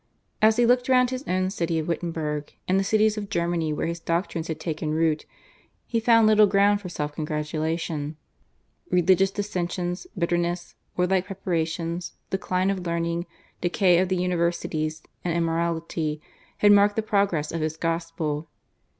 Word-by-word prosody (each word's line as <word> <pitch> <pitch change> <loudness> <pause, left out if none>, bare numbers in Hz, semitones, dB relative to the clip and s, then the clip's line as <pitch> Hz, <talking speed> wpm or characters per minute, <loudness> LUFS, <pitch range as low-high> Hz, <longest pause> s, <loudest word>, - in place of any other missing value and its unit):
As 220 +1 +5
he 240 - +4
looked 245 +2 +3
round 250 -1 +4
his 255 +1 -4
own 185 +1 0
city 170 -3 -1
of 155 - -2
Wittenberg 160 -3 -3
and 185 +1 +3
the - - +1
cities 215 +1 +2
of 205 -1 -6
Germany 170 -3 0
where 150 - -1
his 170 0 -3
doctrines 165 0 -2
had 160 -1 -4
taken 155 -1 -2
root 160 -1 +1 0.6
he 230 - 0
found 230 0 +5
little 215 -1 +6
ground 200 +1 +3
for 185 - -6
self 150 -3 -4
congratulation. 155 0 -3 0.7
Religious 185 +2 +4
dissensions, 180 - -3
bitterness, 175 0 -1 0.2
war 180 - +3
like 185 0 +1
preparations, 170 -2 -2 0.2
decline 190 0 0
of 185 -3 -4
learning, 170 +1 -1 0.3
decay 175 0 +3
of 185 0 +1
the 185 - +1
universities, 170 -3 -1 0.2
and 170 -1 0
immorality, 165 -2 -1 0.4
had 205 - +5
marked 205 0 +5
the 220 - 0
progress 200 -8 +1
of 165 - -3
his 155 0 -2
gospel. 165 -2 -2
175 Hz, 155 wpm, -25 LUFS, 165-195 Hz, 0.7 s, little